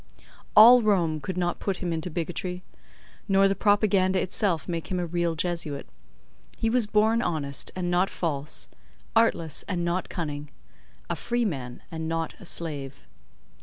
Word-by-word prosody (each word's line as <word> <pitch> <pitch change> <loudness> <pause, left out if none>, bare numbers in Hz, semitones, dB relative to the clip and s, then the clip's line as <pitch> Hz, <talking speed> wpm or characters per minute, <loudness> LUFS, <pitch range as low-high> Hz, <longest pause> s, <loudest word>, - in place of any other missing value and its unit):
'" - - -23
All 240 +4 +10
Rome 175 -8 +2
could 185 +2 -4
not 175 -1 -1
put 190 -2 -3
into 165 -1 -2
him - - -13
bigotry, 180 +2 -3 0.6
nor 195 0 +5
the 195 - +2
Propaganda 195 -2 +3
itself 185 -3 0
make 170 -2 -3
him 185 - -1
a 175 - -1
real 170 0 -1
Jesuit. 165 -4 -3 0.7
He 225 - 0
was 240 -3 +2
born 220 +2 +3
honest, 145 - -1
and 180 -1 -2
not 180 +2 +2
false—artless, 140 - -1
and 175 -3 -1
not 175 +2 -1
cunning—a 145 - -7
freeman, 165 - -2
and 160 -1 -4
not 165 0 -2
a - - -12
slave. 145 -5 -5
175 Hz, 145 wpm, -26 LUFS, 155-195 Hz, 0.7 s, All